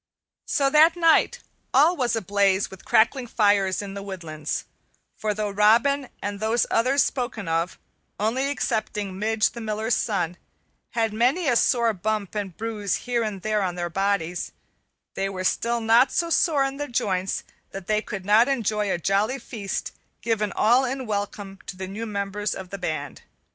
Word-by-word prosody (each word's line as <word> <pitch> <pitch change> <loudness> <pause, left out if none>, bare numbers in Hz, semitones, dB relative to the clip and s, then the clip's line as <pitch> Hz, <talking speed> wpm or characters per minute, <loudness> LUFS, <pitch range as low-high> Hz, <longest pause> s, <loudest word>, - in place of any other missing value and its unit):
So 275 -2 +2
that 315 +3 +6
night 345 +8 +3 0.3
all 310 +7 +6
was 250 -6 0
ablaze 200 -2 +1
with 190 - -12
crackling 245 +3 +3
fires 205 -4 +2
in 195 -1 -7
the 200 - -6
woodlands, 165 -6 -5 0.5
for 215 - -2
though 210 -1 -2
Robin 235 +7 +3
and 205 0 -3
those 220 +2 +1
others 260 +5 +3
spoken 240 -6 -3
of, 165 +2 -1 0.4
only 230 +6 0
excepting 210 -8 -2
Midge, 215 0 +1
the 235 - -8
Miller's 220 +1 -1
son, 180 -6 -1 0.6
had 225 -2 0
many 255 +10 +2
a 245 - +3
sore 235 -1 +3
bump 210 +1 -2
and 200 -5 -4
bruise 215 -3 -2
here 245 -1 0
and 210 -4 -4
there 215 -1 +1
on 180 -2 -1
their 175 -1 -3
bodies, 195 -2 -1 0.6
they 195 0 -2
were 185 -1 -5
still 235 +5 +1
not 230 +3 +4
so 335 -1 0
sore 310 -4 +3
in 270 0 -2
the 290 0 -3
joints 190 -6 -1 0.3
that 195 -1 -8
they 215 +2 +1
could 195 -4 -6
not 215 +4 +5
enjoy 215 -6 0
a - - +1
jolly 200 - +1
feast 215 -6 -5 0.3
given 215 -3 0
all 240 +5 +4
in 260 0 -3
welcome 205 -2 -4
to 185 - -7
the 190 0 -5
new 215 +4 -5
members 200 0 -2
of 190 -1 -8
the 200 - -5
band. 155 -5 -4
215 Hz, 170 wpm, -24 LUFS, 195-240 Hz, 0.6 s, that